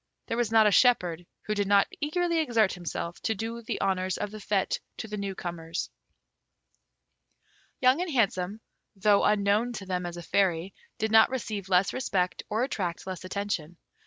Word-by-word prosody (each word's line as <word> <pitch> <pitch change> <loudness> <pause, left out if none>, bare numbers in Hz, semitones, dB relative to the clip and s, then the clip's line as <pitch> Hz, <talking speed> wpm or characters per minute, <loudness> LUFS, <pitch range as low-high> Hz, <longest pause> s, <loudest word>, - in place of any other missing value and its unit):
There 230 - -3
was 240 -2 0
not 220 -1 +6
a 210 - +5
shepherd 180 -8 +3 0.2
who 215 - -2
did 205 -1 0
not 200 0 +5 0.2
eagerly 335 +3 +1
exert 230 -9 +2
himself 175 -1 -5
to 220 - 0
do 230 +3 -4
the 230 - -4
honours 185 -1 0
of 205 -1 -3
the 215 - -8
fête 200 -1 0 0.2
to - - -5
the 210 - -5
new 200 -2 -4
comers. 170 -1 -5 1.9
Young 260 +5 +4
and 360 - -2
Handsome, 205 -4 0 0.3
though 200 +1 +3
unknown 210 +3 +2
to 205 -4 -6
them 180 -1 -2
as 175 0 -7
a 175 - -7
Fairy, 185 0 +1 0.2
did 220 0 -1
not 220 0 +7
receive 215 -7 -4
less 185 0 +3
respect 185 -8 -1
or 220 +3 0
attract 180 -9 -3
less 185 -2 -6
attention. 185 -4 -3
200 Hz, 175 wpm, -28 LUFS, 185-225 Hz, 1.9 s, not